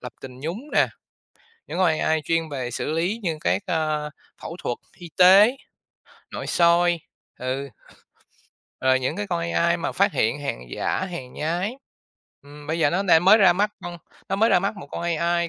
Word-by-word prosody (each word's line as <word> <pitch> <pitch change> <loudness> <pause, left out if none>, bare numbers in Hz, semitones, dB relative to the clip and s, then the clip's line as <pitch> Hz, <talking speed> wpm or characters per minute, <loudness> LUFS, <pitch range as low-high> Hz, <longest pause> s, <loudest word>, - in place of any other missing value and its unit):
lập 125 -1 -8
trình 130 -1 -10
nhúng 165 +7 -4
nè, - - +4 0.8
những - - -5
con 185 - +4
AI 160 0 +1
chuyên 165 -1 0
về 130 -4 -4
xử 150 - -3
lý 180 +8 -1
như 165 -5 -2
các, 205 - 0
ờ, 155 -3 -1 0.3
phẫu 165 - -7
thuật 120 - -2 0.2
y 175 -2 -11
tế, 200 +8 +7 0.8
nội - - -5
soi, 170 0 +3 0.4
ừ. 130 +2 -3 1.1
Rồi 130 0 +3
những 130 - -2
cái 105 - -3
con 85 - -2
AI 85 - +2
mà - - -3
phát - - +2
hiện 115 +7 0
hàng 140 - -4
giả, 190 - -1
hàng 135 -9 -7
nhái, 175 +9 -2 0.7
ừm, 145 +1 -13
bây 160 +2 -2
giờ 145 - +4
nó 190 +3 0
đang 175 -3 +4
mới 215 +4 +7
ra 190 -3 +6
mắt 205 +3 +1
con 175 -1 -6 0.3
nó 195 - -1
mới 225 +3 +3
ra - - +5
mắt 200 +3 -2
một 180 - -9
con - - -5
AI 170 0 0
165 Hz, 190 wpm, -23 LUFS, 145-180 Hz, 1.1 s, tế